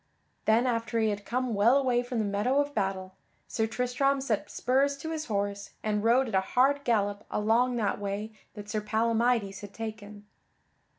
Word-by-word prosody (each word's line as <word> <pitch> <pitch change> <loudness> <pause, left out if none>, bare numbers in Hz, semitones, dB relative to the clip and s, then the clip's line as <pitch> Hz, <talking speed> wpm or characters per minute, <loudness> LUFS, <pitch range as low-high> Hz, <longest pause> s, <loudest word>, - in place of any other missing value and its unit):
Then 225 +3 +4
after 230 -2 0
he 220 -1 +2
had 205 -1 -4
come 250 0 -1
well 220 +6 +4
away 250 -3 +2
from 245 0 -5
the 220 - +1
meadow 205 +7 +1
of 290 0 0
battle, 190 -4 -2 0.3
Sir 220 -1 -1
Tristram 250 +4 0
set 240 -6 -2
spurs 275 +3 +1
to 320 +3 -6
his 310 -1 -3
horse 200 -2 -3
and 210 -1 0
rode 245 +3 +4
at 225 - -6
a 190 - +4
hard 270 +8 +2
gallop 205 -4 0
along 235 +4 +2
that 215 -4 -1
way 205 +2 -4 0.2
that 205 -1 -8
Sir 210 +1 -2
Palamydes 225 -1 +1
had 205 -1 -10
taken. 210 -2 -7
225 Hz, 180 wpm, -28 LUFS, 205-250 Hz, 0.3 s, Then